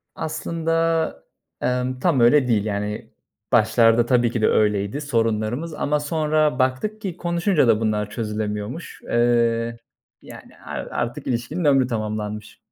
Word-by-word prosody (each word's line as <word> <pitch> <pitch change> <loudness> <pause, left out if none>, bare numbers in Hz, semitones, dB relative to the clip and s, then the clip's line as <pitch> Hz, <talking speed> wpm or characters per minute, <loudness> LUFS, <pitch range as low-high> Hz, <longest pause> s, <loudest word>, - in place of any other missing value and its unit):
Aslında, 165 +1 -1 0.5
emm, 125 0 -1
tam 165 -6 +2
öyle 125 +3 +5
değil. 110 -3 +1
Yani, 105 0 -3 0.4
başlarda 115 +1 +4
tabii 120 -2 +2
ki 115 - -2
de - - +4
öyleydi 105 +4 +1
sorunlarımız 115 +3 -1
ama 150 0 0
sonra 150 -2 0
baktık 130 +13 0
ki 185 -4 -5
konuşunca 170 - +1
da 110 -1 +4
bunlar 105 -1 0
çözülemiyormuş. 105 +6 -4
Eee, 115 -1 +1 0.4
yani, - - -13
ar - - -5
artık 120 +4 -3
ilişkinin 120 +8 -2
ömrü 135 -3 +4
tamamlanmış. 105 -2 -4
120 Hz, 125 wpm, -22 LUFS, 110-150 Hz, 0.5 s, öyle